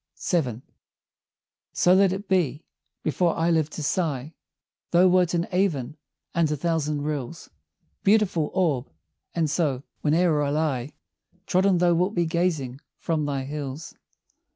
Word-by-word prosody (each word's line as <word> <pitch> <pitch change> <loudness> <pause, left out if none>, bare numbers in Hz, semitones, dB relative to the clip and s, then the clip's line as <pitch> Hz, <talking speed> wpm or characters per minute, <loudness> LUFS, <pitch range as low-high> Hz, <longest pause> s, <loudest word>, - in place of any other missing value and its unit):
VII. 130 - 0 1.1
So 180 - +4
let 190 0 +5
it 195 +2 -5
be: 165 -6 +1 0.4
Before 170 +2 +1
I 165 +1 +2
lived 160 -2 +1
to 155 - -5
sigh, 150 -3 -1 0.6
Thou 175 +2 +5
wert 180 -1 +3
in 170 0 0
Avon, 165 -8 0 0.4
and 170 -2 +2
a 150 - -1
thousand 150 -2 -1
rills, 150 +1 -5 0.5
Beautiful 195 -7 +3
Orb! 150 -9 +1 0.5
and 165 -2 +1
so, 145 -4 0 0.2
whene'er 160 0 +2
I 145 - 0
lie 145 -3 -1 0.5
Trodden, 190 0 +3
thou 175 0 +3
wilt 180 +5 +1
be 175 -1 +2
gazing 160 -6 -1 0.2
from 155 -3 -1
thy 140 -2 -2
hills. 145 +1 -6
160 Hz, 135 wpm, -25 LUFS, 145-180 Hz, 1.1 s, let